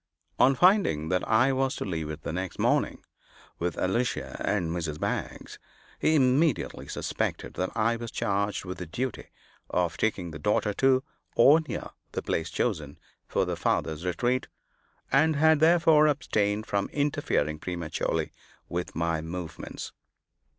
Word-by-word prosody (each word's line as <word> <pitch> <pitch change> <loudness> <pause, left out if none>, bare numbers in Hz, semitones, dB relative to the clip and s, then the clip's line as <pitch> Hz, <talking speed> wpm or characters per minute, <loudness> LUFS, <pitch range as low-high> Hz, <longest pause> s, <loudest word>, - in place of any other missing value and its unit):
On 135 +1 +5
finding 175 - +3
that 90 0 +1
I 130 +5 +4
was 130 0 0
to - - -4
leave 80 -5 -3
it 75 0 -7
the - - -4
next 95 0 -4
morning, - - +1 0.6
with 85 0 -2
Alicia 120 +7 -1
and 90 -6 0
Mrs. 80 -3 -3
Baggs, - - -4 0.4
he 160 - +3
immediately 135 +1 +2
suspected - - -3
that 95 - -2
I 115 +1 +2
was 115 0 -6
charged 100 -1 -1
with 90 0 -6
the 90 - -5
duty 125 +9 -3 0.4
of 85 -3 0
taking 95 -4 -1
the 75 - -8
daughter 105 +4 +1
to, 130 +3 +3 0.3
or 145 +7 +7
near, - - -5 0.2
the - - -3
place 80 - -1
chosen 80 -11 -2 0.3
for - - +1
the - - -2
father's 80 0 -1
retreat; 120 +9 0 0.6
and 155 +4 +4
had 160 +1 +5
therefore 160 -1 +5
abstained 110 -7 0
from 100 -1 -1
interfering 80 - 0
prematurely 85 -2 -2 0.4
with 90 +1 -4
my 85 -1 0
movements. 85 +1 -6
100 Hz, 145 wpm, -28 LUFS, 85-135 Hz, 0.6 s, or